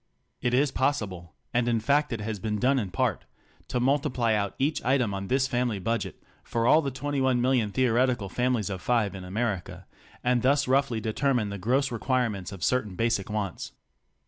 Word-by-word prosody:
It 125 0 +1
is 140 +1 +3
possible 100 - -2
— - - -46
and 120 0 +2
in 115 -1 +2
fact 140 +6 +2
it 115 -3 -3
has 105 -1 -4
been 105 +2 -2
done 130 +4 +2
in 100 -5 -3
part 90 - -1 0.2
— - - -32
to 125 - -1
multi 135 +3 +2
ply 120 -3 +1
out 100 -2 -1
each 145 +4 0
item 125 -5 +2
on 95 0 -4
this 130 +2 +2
family 120 -4 0
budget 115 +2 -3 0.2
for 115 -1 -1
all 155 +6 +6
the 140 - -2
21 130 -1 0
million 125 -3 +2
theoretical 125 -2 +2
families 125 -1 0
of 95 -2 -5
five 110 -5 +1
in 95 -1 -7
America, 95 -1 -3 0.4
and 125 -1 +2
thus 140 +2 +3
roughly 130 -4 +2
de 110 0 -2
termine 125 -6 +1
the 100 - -5
gross 130 +7 +1
requirements 115 -6 -1
of 95 -3 -8
certain 110 -7 0
basic 115 -2 0
wants. 105 -4 -4
120 Hz, 200 wpm, -27 LUFS, 105-130 Hz, 0.4 s, all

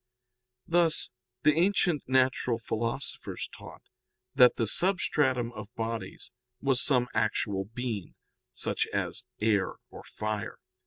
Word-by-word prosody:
Thus 165 -1 +2 0.3
the 150 - +6
ancient 170 -4 +2
natural 130 -2 +2
philosophers 115 +3 -3
taught - - -12 0.5
that 125 -3 +7
the 115 - 0
substratum 130 - +2
of 110 -2 -9
bodies 115 -3 -4 0.3
was 135 -2 +2
some 125 -4 +3
actual 105 -2 0
being, 115 -7 -4 0.4
such - - -1
as 120 - -2 0.2
air 105 -3 +1 0.2
or - - -10
fire. 110 -1 -4
125 Hz, 110 wpm, -29 LUFS, 110-140 Hz, 0.5 s, that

